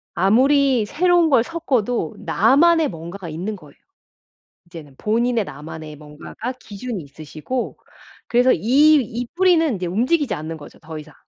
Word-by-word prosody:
아무리 255 +6 +3
새로운 350 - +2
걸 265 -5 +4
섞어도 245 - -2
나만의 315 - +3
뭔가가 170 +1 -8
있는 180 +7 -4
거예요. 150 -7 -16 0.9
이제는 160 -5 -12
본인의 230 +1 0
나만의 150 0 -9
뭔가가 150 - -8
기준이 210 -1 -6
있으시고 155 - -6 0.5
그래서 250 +2 +4
이 290 +6 +4
이 240 0 -5
뿌리는 340 - +3
이제 180 -1 -4
움직이지 245 - 0
않는 160 0 -6
거죠 145 - -14
더 160 0 -8
이상. 150 -1 -12
220 Hz, 325 characters per minute, -21 LUFS, 160-275 Hz, 0.9 s, 걸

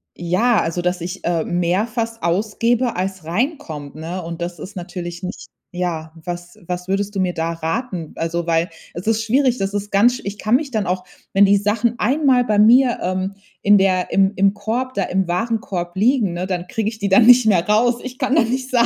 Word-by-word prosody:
ja, 205 +7 +2
also 165 +2 -2
dass 180 0 -1
ich, 180 +3 -6
äh, 170 -2 +1
mehr 180 +5 0
fast 230 0 -4
ausgebe 225 +7 0
als 185 -2 -3
reinkommt, 170 - -3
ne. 165 +4 -5
Und 170 +1 -7
das 175 -1 -6
ist 190 +7 -9
natürlich 175 -1 -6
nicht 185 +2 -6 0.2
Ja, 170 -3 -3
was 175 +1 -7
was 180 0 -4
würdest 200 +2 -1
du - - -1
mir 185 -1 0
da 165 0 -2
raten? 165 +1 -4
Also, 170 +1 -2
weil 165 0 +1 0.2
es 175 +4 -7
ist 225 0 +2
schwierig, 255 +2 +2
das 195 -2 -2
ist 205 0 -3
ganz 240 +5 +3
Ich 200 +1 -5
kann 215 +4 +1
mich 290 0 -5
dann 215 -4 -1
auch 185 +1 -1 0.3
wenn 200 +1 +6
die 200 +1 +4
Sachen 210 +4 0
einmal 265 +1 +3
bei 210 -3 +1
mir, 240 +3 +5
ähm, 185 +2 -2 0.3
in 205 0 +6
der 185 -2 +1
im 195 +1 +3
im 195 0 +3
Korb 225 +5 -3
da 195 - +1
im 190 0 -1
Warenkorb 180 -2 -2
liegen, 215 -2 +2
ne, 175 +1 -3
dann 180 -2 -3
kriege 215 +2 -1
ich 220 -1 -10
die 200 -1 -1
dann 195 +4 +6
nicht 245 -1 +7
mehr 185 -5 +3
raus. 230 +3 +3
Ich 255 0 -8
kann 265 +1 +1
da 320 - +5
nicht 255 +3 -2
sein. 240 -2 +3
195 Hz, 215 wpm, -20 LUFS, 175-230 Hz, 0.3 s, nicht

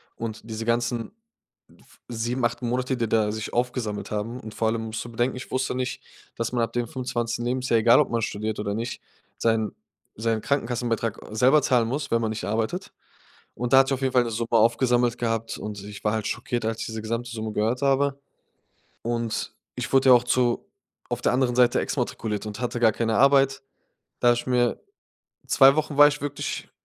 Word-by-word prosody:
Und 110 -1 -5
diese 110 0 -4
ganzen 120 0 -1 0.7
f - - -23
7, 120 +2 -2
8 120 +2 -1
Monate, 125 +2 -1
die 115 -2 0
da 105 -2 +2
sich 110 0 -5
aufgesammelt 120 -4 -2
haben, 110 +4 -3
und 110 - -9
vor 110 - 0
allem 115 0 -1
musst 110 0 -4
du - - -8
bedenken, 120 +2 -1
ich 125 - -8
wusste 130 0 0
nicht, 125 0 -3 0.4
dass 115 0 -2
man 120 - +1
ab - - -3
dem 120 -1 0
25. 120 -2 -3
Lebensjahr, 125 -2 +1
egal 115 +5 +6
ob - - -1
man 115 -1 0
studiert 110 +1 -3
oder 100 -1 -2
nicht, 115 +2 -4 0.4
seinen 110 -2 +1 0.4
seinen 110 0 -1
Krankenkassenbetrag 115 -4 -1
selber 130 +7 +4
zahlen 120 -3 +3
muss, 140 +4 -3
wenn 115 - +3
man 110 -1 -1
nicht 110 - -5
arbeitet. 115 - -2 0.6
Und 125 +1 -2
da 135 - +9
hat 135 - +4
sich - - +1
auf - - -8
jeden 130 -1 0
Fall 125 -1 +5
'ne 115 - -3
Summe 115 +1 -3
aufgesammelt 120 +1 +3
gehabt 115 -1 -2
und 105 -2 -6
ich 105 0 -10
war 105 - +2
halt 110 -2 -2
schockiert, 120 -2 -3
als 115 0 -2
ich - - -2
diese 110 -1 -5
gesamte 115 +2 -3
Summe 110 -1 -4
gehört 115 +5 0
habe, 140 0 +2 0.9
und 115 -1 -2 0.2
ich - - -4
wurde 135 0 +5
ja 125 - +10
auch 120 - +3
zu 125 -1 +1 0.4
auf - - -3
der - - +2
anderen 125 -1 +1
Seite 125 -1 +4
exmatrikuliert 105 -1 -3
und 105 +1 -7
hatte 120 -1 -2
gar 115 -2 +5
keine 115 -1 0
Arbeit, 135 0 +4 0.6
da 120 0 +6
ich 120 - -4
mir 120 -1 +2 0.7
2 135 +1 +6
Wochen 150 -2 -1
war 145 0 +10
ich 150 0 -4
wirklich 145 -1 -4
120 Hz, 200 wpm, -25 LUFS, 110-125 Hz, 0.9 s, ja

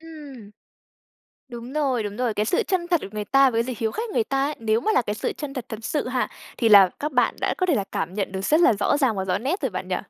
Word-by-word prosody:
Ừm. 290 -10 -11 1.0
Đúng 240 +1 -9
rồi, 275 -6 0
đúng 205 -1 -5
rồi. 245 -3 -1
Cái 210 - 0
sự - - +1
chân 360 -2 -2
thật 345 -3 +2
của - - -6
người 210 -1 -4
ta 270 +4 +4
với 230 -1 +1
dự 255 - -4
hiếu 220 -1 -1
khách 455 0 -4
người 450 - +1
ta 275 -7 0
ấy, 300 - -3
nếu 225 0 +1
mà 435 - 0
là - - +3
cái 210 -2 -3
sự - - -3
chân 290 -2 -7
thật 255 -5 -5
thật 220 0 -8
sự 290 -2 -2
ha, 255 0 -1 0.3
thì 230 - +3
là 200 -3 +8
các 300 0 -3
bạn 250 - +2
đã - - 0
có 370 - +1
thể 340 - +2
là 200 -6 0
cảm 175 +3 -3
nhận 195 -2 -3
được 190 - -3
rất 310 - +3
là 340 - +6
rõ 205 +5 +1
ràng 260 -7 +1
và 190 - -2
rõ 185 0 0
nét 280 - -2
rồi 265 -5 -1
bạn 185 0 -5
nhỉ? 185 - 0
245 Hz, 295 wpm, -23 LUFS, 210-295 Hz, 1.0 s, là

